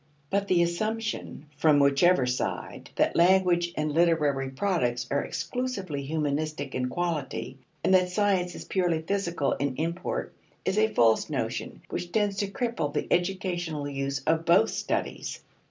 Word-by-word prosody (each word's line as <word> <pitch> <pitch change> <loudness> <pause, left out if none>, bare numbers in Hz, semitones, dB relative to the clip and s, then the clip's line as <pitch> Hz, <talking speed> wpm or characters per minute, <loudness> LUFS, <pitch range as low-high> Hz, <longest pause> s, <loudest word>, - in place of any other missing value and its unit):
But 200 0 +1
the 175 -2 +4
assumption, 215 -1 -3
from 150 -1 +5
whichever 140 +2 +4
side, 125 0 -3
that - - +2
language 175 -1 +4
and 150 0 0
literary 150 -5 +2
products 130 -7 0
are 140 - +1
exclusively 200 - -3
humanistic 150 -1 -2
in 125 0 -1
quality, 155 -5 -3 0.2
and - - +3
that 185 -1 +4
science 180 -2 +1
is - - -8
purely 175 -4 0
physical 170 -7 -1
in 140 -2 -1
import, 170 - -3 0.3
is 190 +2 +1
a 220 0 +3
false 115 -2 +3
notion - - -3
which 175 - -4
tends 205 -1 +1
to 200 - 0
cripple 230 - -2
the - - -1
educational 175 -4 -1
use 135 -1 -3
of 160 0 +2
both 175 +7 +4
studies. - - -3
170 Hz, 145 wpm, -27 LUFS, 145-190 Hz, 0.3 s, from